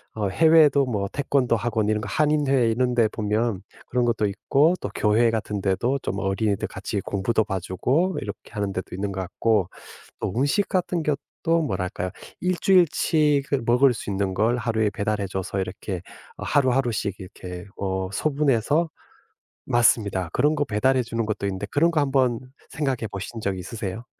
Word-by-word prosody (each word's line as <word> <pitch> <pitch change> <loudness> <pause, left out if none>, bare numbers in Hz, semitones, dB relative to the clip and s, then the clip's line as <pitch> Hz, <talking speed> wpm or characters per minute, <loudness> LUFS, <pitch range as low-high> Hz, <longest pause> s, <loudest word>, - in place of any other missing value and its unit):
어 105 -2 -1
해외에도 150 - +5
뭐 105 -6 -2
태권도 135 -4 +1
학원 110 -1 -1
이런 105 0 +1
거 100 - -5
한인회 140 -1 +2
이런 125 +2 +1
데 115 -2 +4
보면 105 -1 -1 0.3
그런 125 0 0
것도 115 -2 +1
있고 140 - +2
또 - - -3
교회 115 +2 +3
같은데도 110 +4 -1
좀 100 - -2
어린이들 100 +1 0
같이 - - -4
공부도 110 +3 0
봐주고 105 - 0
이렇게 - - -8
하는 100 -3 -2
데도 95 - -5
있는 100 +1 -3
것 95 - -3
같고 100 +1 0 0.5
또 - - -3
음식 145 +10 +2
같은 180 -2 0
것도 155 +3 -1
뭐랄까요? 90 -5 -3 0.3
1 180 0 0
주일 185 -2 +5
치 150 -3 +2
그 140 -3 0
먹을 125 +2 +4
수 110 - -6
있는 95 -1 -1
걸 115 +5 +2
하루에 110 -2 0
배달해 105 -1 -1
줘서 95 +1 -3
이렇게 95 -1 -5 0.4
어 - - -7
하루하루씩 125 -7 +1
이렇게 90 -1 -8
어 95 -1 -2
소분해서 145 +3 +1 0.8
맞습니다. 105 -6 +2
그런 150 +4 +2
거 145 - +1
배달해 130 +3 +2
주는 115 -1 -2
것도 105 -2 -3
있는데 95 +1 -3
그런 165 +8 +2
거 160 - +1
한번 130 -4 +2 0.3
생각해 135 -6 -1
보신 100 +4 -6
적 100 -2 -1
있으세요? 105 +3 -6
115 Hz, 340 characters per minute, -24 LUFS, 100-140 Hz, 0.8 s, 해외에도